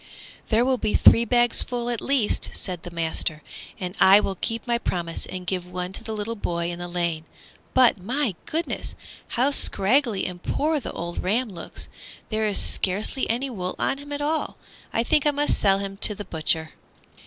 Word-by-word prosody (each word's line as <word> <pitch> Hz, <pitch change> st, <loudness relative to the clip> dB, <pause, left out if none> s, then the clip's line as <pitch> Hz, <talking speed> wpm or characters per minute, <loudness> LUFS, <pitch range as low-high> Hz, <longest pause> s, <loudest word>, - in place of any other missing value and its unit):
"There 230 Hz, +2 st, +3 dB
will 260 Hz, -1 st, +1 dB
be 215 Hz, -, 0 dB
three 235 Hz, -, +6 dB
bagsful 240 Hz, 0 st, +2 dB
at 235 Hz, -, -2 dB
the -, -, -8 dB
least," 270 Hz, -6 st, +1 dB
said 180 Hz, -3 st, -3 dB
the 175 Hz, -, -8 dB
master, 160 Hz, -2 st, -1 dB, 0.4 s
"and 180 Hz, 0 st, -5 dB
I 195 Hz, +2 st, +8 dB
will 195 Hz, -, -1 dB
keep 225 Hz, +4 st, -4 dB
my 235 Hz, -1 st, +1 dB
promise 170 Hz, -6 st, -3 dB
and 185 Hz, -1 st, -6 dB
give 180 Hz, 0 st, -1 dB
one 180 Hz, +1 st, -4 dB
to -, -, -5 dB
the 220 Hz, -, -4 dB
little 215 Hz, +2 st, -3 dB
boy 170 Hz, -4 st, -2 dB
in 175 Hz, -, -7 dB
the 175 Hz, -, -5 dB
lane. 170 Hz, -2 st, -2 dB, 0.5 s
But, 250 Hz, -5 st, +5 dB
my 245 Hz, +4 st, 0 dB
goodness! 330 Hz, +2 st, -3 dB, 0.4 s
how 260 Hz, +4 st, +3 dB
scraggly 230 Hz, -3 st, +3 dB
and 180 Hz, -1 st, -6 dB
poor 305 Hz, +8 st, 0 dB
the 255 Hz, -, -6 dB
old 170 Hz, +1 st, -5 dB
ram 225 Hz, +6 st, +1 dB
looks. 175 Hz, -4 st, -8 dB, 0.4 s
There 220 Hz, -1 st, 0 dB
is 205 Hz, -, 0 dB
scarcely 200 Hz, +7 st, 0 dB
any 255 Hz, +4 st, -1 dB
wool 185 Hz, -5 st, -4 dB
on 275 Hz, -, 0 dB
him 290 Hz, +1 st, -10 dB
at 290 Hz, 0 st, -3 dB
all. 310 Hz, +2 st, -1 dB, 0.3 s
I 230 Hz, -, +1 dB
think 300 Hz, +3 st, +2 dB
I -, -, +6 dB
must 290 Hz, 0 st, +1 dB
sell 195 Hz, -1 st, +5 dB
him 195 Hz, 0 st, -5 dB
to 210 Hz, +1 st, +2 dB
the 205 Hz, -, -7 dB
butcher!" 160 Hz, 0 st, -1 dB
210 Hz, 195 wpm, -24 LUFS, 180-245 Hz, 0.5 s, I